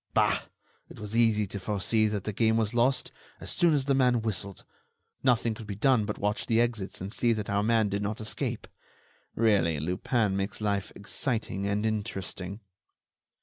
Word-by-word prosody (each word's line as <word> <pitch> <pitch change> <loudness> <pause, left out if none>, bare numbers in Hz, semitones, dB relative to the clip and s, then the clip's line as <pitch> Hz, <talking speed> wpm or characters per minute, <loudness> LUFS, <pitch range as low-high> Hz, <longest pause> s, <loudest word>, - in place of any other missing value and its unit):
Bah! - - +3 0.4
It - - -12
was 105 +1 -6
easy 110 -2 +4
to 100 +1 -6
foresee 105 +3 +1
that 105 -3 -2
the 105 - -3
game 110 +2 +2
was 110 0 0
lost, 120 +3 +2 0.3
as - - -4
soon 170 -1 +3
as 145 -3 +1
the 140 - +2
man 125 -3 +3
whistled; 100 -3 -4 0.6
nothing 120 -3 +2
could 110 0 -10
be 100 - -4
done 120 0 +3
but - - -3
watch 105 +3 -1
the 115 0 +3
exits 115 -5 -1
and 95 +3 -4
see 120 -1 +2
that 105 -2 -3
our 100 0 +2
man 110 0 +3
did 100 0 -2
not 105 +1 -2
escape. 110 -1 -4 0.7
Really, 100 -9 +3
Lupin 95 - 0
makes 100 +1 -2
life 100 -2 -1
exciting 100 -2 -2
and 105 +1 0
interesting." 100 -2 -3
105 Hz, 180 wpm, -28 LUFS, 100-115 Hz, 0.7 s, easy